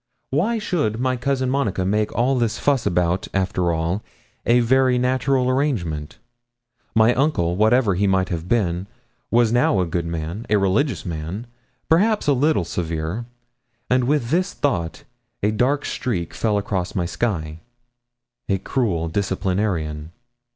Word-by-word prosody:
Why 195 Hz, -, +1 dB
should 150 Hz, -, -1 dB
my 130 Hz, 0 st, +1 dB
cousin 130 Hz, 0 st, 0 dB
Monica 110 Hz, -9 st, 0 dB
make 105 Hz, +2 st, +1 dB
all 125 Hz, +3 st, +2 dB
this 115 Hz, -2 st, 0 dB
fuss 140 Hz, -5 st, +1 dB
about, 90 Hz, +1 st, +1 dB
after 90 Hz, -2 st, +1 dB
all, 85 Hz, +5 st, -1 dB, 0.5 s
a 120 Hz, +1 st, +5 dB
very 130 Hz, +1 st, +3 dB
natural 130 Hz, +1 st, +1 dB
arrangement? 110 Hz, -, -1 dB, 0.8 s
My 110 Hz, +2 st, +5 dB
uncle, 120 Hz, -, +1 dB
whatever 110 Hz, +1 st, +3 dB
he 100 Hz, +3 st, +1 dB
might 95 Hz, -1 st, +2 dB
have 85 Hz, 0 st, -4 dB
been, 95 Hz, -5 st, 0 dB, 0.4 s
was 120 Hz, -1 st, +3 dB
now 120 Hz, -5 st, +3 dB
a 90 Hz, -, +2 dB
good 85 Hz, 0 st, -2 dB
man 85 Hz, +6 st, -4 dB
a 105 Hz, -, +4 dB
religious 100 Hz, +9 st, +1 dB
man 85 Hz, +6 st, -5 dB, 0.4 s
perhaps 205 Hz, +7 st, +3 dB
a 145 Hz, -, +4 dB
little 140 Hz, -, +2 dB
severe; 85 Hz, +6 st, -3 dB, 0.7 s
and 125 Hz, -1 st, +3 dB
with 135 Hz, -3 st, 0 dB
this 185 Hz, +4 st, +1 dB
thought 90 Hz, -, -1 dB, 0.4 s
a 105 Hz, -, +3 dB
dark 130 Hz, +7 st, +1 dB
streak 100 Hz, -10 st, -3 dB
fell 105 Hz, -2 st, 0 dB
across 95 Hz, -3 st, -2 dB
my 90 Hz, -, 0 dB
sky. 85 Hz, -5 st, -2 dB, 0.9 s
A 100 Hz, -, +2 dB
cruel 95 Hz, -7 st, -1 dB
disciplinarian! 90 Hz, -4 st, -2 dB
105 Hz, 145 wpm, -22 LUFS, 90-130 Hz, 0.9 s, a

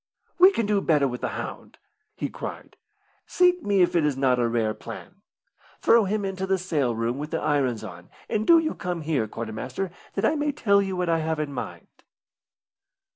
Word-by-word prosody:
"We 370 Hz, +2 st, +9 dB
can 230 Hz, -, -1 dB
do 205 Hz, -1 st, +1 dB
better 150 Hz, -6 st, +3 dB
with 125 Hz, -1 st, -5 dB
the -, -, -1 dB
hound!" -, -, -7 dB, 0.4 s
he -, -, -3 dB
cried. -, -, -8 dB, 0.5 s
"Sink 360 Hz, 0 st, +3 dB
me 200 Hz, -7 st, +3 dB
if 175 Hz, -, 0 dB
it 170 Hz, -, +3 dB
is 145 Hz, -3 st, 0 dB
not 130 Hz, -2 st, +2 dB
a 120 Hz, -, +2 dB
rare 115 Hz, -2 st, 0 dB
plan. -, -, -10 dB, 0.6 s
Throw 230 Hz, -2 st, +5 dB
him 205 Hz, +1 st, -1 dB
into 190 Hz, 0 st, -3 dB
the 190 Hz, 0 st, +2 dB
sail 150 Hz, -10 st, -1 dB
room 115 Hz, +3 st, -2 dB
with 150 Hz, +1 st, -5 dB
the 165 Hz, -, -2 dB
irons 130 Hz, -7 st, 0 dB
on, 90 Hz, -4 st, -10 dB, 0.2 s
and 215 Hz, 0 st, -1 dB
do 335 Hz, -, +8 dB
you 320 Hz, -1 st, +1 dB
come 180 Hz, -3 st, -4 dB
here, 150 Hz, -8 st, 0 dB
quarter 110 Hz, +1 st, -6 dB
master, 130 Hz, -, -4 dB, 0.2 s
that 195 Hz, -, 0 dB
I -, -, +3 dB
may 295 Hz, -1 st, -1 dB
tell 200 Hz, -7 st, +3 dB
you 195 Hz, -1 st, -2 dB
what 180 Hz, -1 st, -1 dB
I 165 Hz, -1 st, +2 dB
have 160 Hz, 0 st, -2 dB
in 150 Hz, -2 st, -3 dB
my 130 Hz, -, -2 dB
mind." -, -, -16 dB
165 Hz, 210 wpm, -25 LUFS, 130-200 Hz, 0.6 s, We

